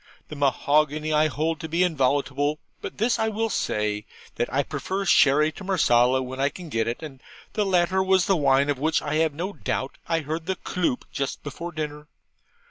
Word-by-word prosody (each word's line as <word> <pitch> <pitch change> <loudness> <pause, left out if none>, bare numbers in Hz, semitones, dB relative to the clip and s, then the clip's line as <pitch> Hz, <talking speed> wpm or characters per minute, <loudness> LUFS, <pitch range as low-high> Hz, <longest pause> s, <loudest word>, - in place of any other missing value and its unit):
The 155 - -7
mahogany 150 +2 +1
I 155 +1 +4
hold 155 +2 -1
to 160 - -6
be 170 +3 +2
inviolable; 145 -1 +1 0.2
but - - -7
this 225 +3 +1
I 220 - +1
will 220 +1 -1
say, 105 - -1 0.3
that 120 - -1
I 140 +3 +1
prefer 185 +9 -3
sherry 150 -2 +5
to 195 - -11
marsala 130 -9 +3
when 130 +1 -7
I 140 +1 +2
can 175 +2 -10
get 115 -5 0
it, 120 +7 -3
and 140 -4 -9 0.3
the 210 -2 0
latter 185 0 +2
was 190 -1 +3
the 195 - +3
wine 140 -2 +3
of 140 - -3
which 155 +2 +1
I 150 +1 -1
have 160 -2 +1
no 185 +6 -3
doubt 135 -7 -3
I 165 -1 +1
heard 160 +2 -4
the 190 - 0
'cloop' 175 -8 -2
just 140 -1 -3
before 170 +5 -6
dinner. 150 -2 -5
150 Hz, 200 wpm, -25 LUFS, 140-175 Hz, 0.3 s, sherry